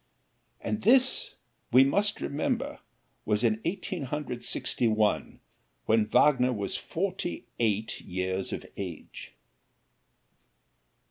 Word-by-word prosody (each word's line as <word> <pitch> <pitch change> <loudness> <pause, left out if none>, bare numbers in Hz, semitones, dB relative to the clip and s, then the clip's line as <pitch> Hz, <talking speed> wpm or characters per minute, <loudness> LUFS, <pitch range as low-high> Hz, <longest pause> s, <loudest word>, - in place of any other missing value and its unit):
And 215 - -2
this, 260 - +4 0.4
we 130 +2 +8
must 200 +10 +1
remember, 145 +2 -2 0.4
was 105 +1 0
in 110 -1 +2
Eighteen 180 -3 -3
Hundred 130 -3 -4
Sixty 120 - 0
one, 110 -1 0 0.4
when 110 -1 +3
Wagner 125 +2 +4
was 100 -5 -3
forty 180 -4 -3
eight 110 -1 0
years 95 +1 -3
of - - -5
age. - - -7
125 Hz, 105 wpm, -28 LUFS, 110-175 Hz, 0.4 s, we